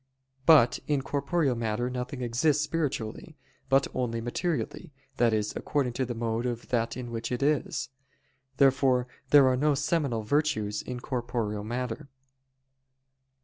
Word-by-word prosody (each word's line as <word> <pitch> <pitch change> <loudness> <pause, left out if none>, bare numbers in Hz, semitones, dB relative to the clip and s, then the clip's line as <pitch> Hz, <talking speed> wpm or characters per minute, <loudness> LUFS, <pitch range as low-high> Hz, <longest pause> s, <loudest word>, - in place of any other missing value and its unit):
But 150 -8 +6
in 145 -3 +1
corporeal 140 +1 0
matter 115 0 -1
nothing 125 +1 -4
exists 135 +5 +2
spiritually, 150 -2 -3 0.3
but 135 +1 +4
only 120 -2 -1
materially, 155 +6 -3 0.3
that 120 -1 +4
is, 105 -1 0
according 135 -5 -1
to 130 0 -1
the 120 - -4
mode 115 +1 -1
of 120 -1 -5
that 115 -1 0
in 120 -2 -6
which 115 0 -4
it 125 +2 -1
is. 150 -3 0 0.7
Therefore 130 -2 +4 0.2
there 140 -2 +7
are 130 - +3
no 145 +3 +2
seminal 145 -6 0
virtues 110 -5 0
in 125 -1 -6
corporeal 120 -5 -3
matter. 125 +5 -4
125 Hz, 140 wpm, -28 LUFS, 115-145 Hz, 0.7 s, there